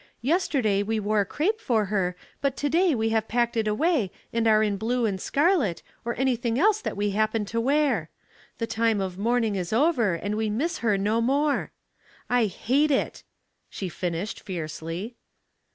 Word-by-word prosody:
Yesterday 265 - +1
we 220 +2 -1
wore 210 0 +1
crape 395 - -1
for 220 -4 +1
her, 190 -3 -1 0.3
but 275 -1 0
to 290 - 0
day 340 0 +3
we 225 -1 0
have 220 0 0
packed 235 0 0
it 220 -1 0
away 245 - +1 0.2
and 230 0 +1
are 215 0 +5
in 205 -2 +1
blue 235 +4 0
and 195 -3 -2
scarlet, 285 - +1 0.2
or 235 0 -3
anything 245 -3 0
else 425 +7 +3
that - - -4
we 205 0 0
happen 215 +1 0
to 230 +3 -2
wear. 285 +4 +1 0.5
The 230 - -1
time 225 -1 +1
of 190 -1 -4
mourning 230 0 +1
is 180 -3 -3
over, 235 - +2
and 205 +5 -3
we 220 0 0
miss 280 +11 -1
her 215 -4 +2
no 210 +4 +1
more.* 280 +4 +1 0.6
I 245 -2 +4
hate 265 - +1
it," 275 - 0 0.5
she 190 - -5
finished, 175 +4 -3
fiercely. 170 +5 -5
225 Hz, 175 wpm, -26 LUFS, 205-265 Hz, 0.6 s, are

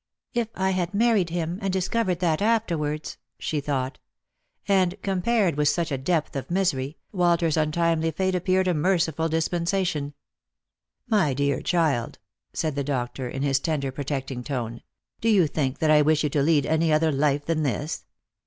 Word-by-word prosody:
" - - -68
If 235 -2 0
I 190 0 +1
had 180 0 -1
married 215 -5 +3
him 170 +1 -3
and 195 -2 -1
discovered 190 0 0
that 165 -2 +1
afterwards! 170 -9 -1
" - - -60
she 150 -2 -2
thought. 135 -2 -2 0.7
And, 190 -1 +2
compared 195 -2 +1
with 150 0 +3
such 165 +2 0
depth 165 -2 0
of 135 -1 -4
misery, 160 -7 0
Walter's 170 -4 +2
untimely 165 +1 +1
fate 190 +4 -1
appeared 185 +1 +1
a 180 - +3
merciful 165 -1 +1
dispensation. 165 -2 -1 0.9
"My 195 - +2
dear 140 -1 0
child," 160 -9 0 0.3
said 155 -2 -2
the 140 0 -2
doctor 130 -2 -3
in 135 +2 -4
his 135 -1 +2
tender 140 -3 -1
protecting 135 -2 -4
tone, 120 -4 -4 0.2
" - - -46
do 230 - +2
you 195 -6 +5
think 140 -2 -1
that 155 -1 +2
I 150 -1 +6
wish 155 +1 +3
you 150 - 0
to 145 - +1
lead 145 -1 +3
any 160 +1 +2
other 155 +1 +3
life 145 0 +1
than 165 -1 0
this 145 +2 -2
160 Hz, 170 wpm, -25 LUFS, 145-180 Hz, 0.9 s, I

